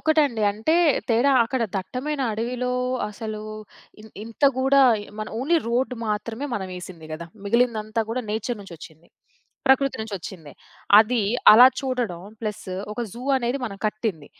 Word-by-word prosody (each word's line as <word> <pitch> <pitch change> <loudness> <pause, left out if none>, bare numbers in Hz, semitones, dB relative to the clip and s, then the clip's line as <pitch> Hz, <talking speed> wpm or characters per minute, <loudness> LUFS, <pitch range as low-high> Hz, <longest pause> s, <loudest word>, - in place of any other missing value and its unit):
ఒకటండి. 290 -8 +2
అంటే 225 +11 0 0.3
తేడా 240 +5 +3
అక్కడ 245 +1 -2
దట్టమైన 265 +9 -4
అడవిలో 250 +3 -2 0.4
అసలు 215 0 -6 0.6
ఇన్ 215 0 -14
ఇంత 230 +5 -3
గూడా 270 +1 +4 0.4
మనం 215 - -5
ఓన్లీ 320 +7 +2
రోడ్డు 250 +2 0
మాత్రమే 225 +6 -3
మనం 190 -3 -4
ఏసింది 170 -3 -10
గదా. 170 +2 -6 0.2
మిగిలిందంతా 225 0 +1
కూడా 250 +2 -2
నేచర్ 220 +1 -3
నుంచొచ్చింది. 165 -3 -13 0.6
ప్రకృతి 265 0 +3
నుంచొచ్చిందే. 190 -7 -7 0.5
అది 225 +2 +3 0.3
అలా 245 +4 +10
చూడడం 245 -10 -2 0.2
ప్లసు, 210 -4 -5 0.2
ఒక 225 - -5
జూ 240 - -9 0.2
అనేది 250 +2 -1
మనం 205 -5 -5
కట్టింది. 210 -8 -3
225 Hz, 135 wpm, -24 LUFS, 210-255 Hz, 0.6 s, అలా